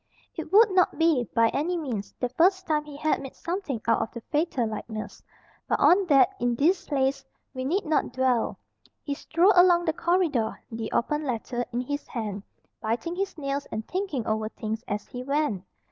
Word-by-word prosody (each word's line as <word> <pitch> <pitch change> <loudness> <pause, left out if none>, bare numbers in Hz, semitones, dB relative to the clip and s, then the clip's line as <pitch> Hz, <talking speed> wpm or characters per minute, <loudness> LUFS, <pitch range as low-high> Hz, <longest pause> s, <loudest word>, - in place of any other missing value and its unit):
It - - -6
would 425 +1 +7
not 370 -1 +3
be, 325 -7 +3
by 230 0 +5
any 345 +5 -1
means, 225 - -4
the 250 - -1
first 370 +8 +3
time 300 -1 0
he 295 -1 -9
had 310 +1 0
made 270 -1 -8
something 340 - -3
out - - +3
of 220 - -3
the 235 - -8
"fatal 295 -5 +1
likeness," 215 -1 -6 0.5
but - - +1
on 375 +1 +5
that, 275 -1 +6
in 245 0 +1
this 340 +9 +2
place, 270 -2 0 0.3
we 255 -1 -4
need 370 +8 0
not 305 -5 +1
dwell. 255 -2 +1 0.5
He 285 - -2
strolled 340 +7 +3
along 350 -1 +6
the 320 - +1
corridor, 335 -11 +1
the 225 -1 -4
open 300 +5 0
letter 245 -2 -2
in 240 +1 -1
his 285 +3 -4
hand, 210 -5 -4 0.4
biting 240 +11 -2
his 390 -1 -3
nails 280 -1 -3
and 220 0 -4
thinking 365 - -2
over 215 0 -1
things 220 +1 -5
as 205 0 -3
he 250 - -7
went. 280 -7 -1
275 Hz, 190 wpm, -26 LUFS, 230-335 Hz, 0.5 s, would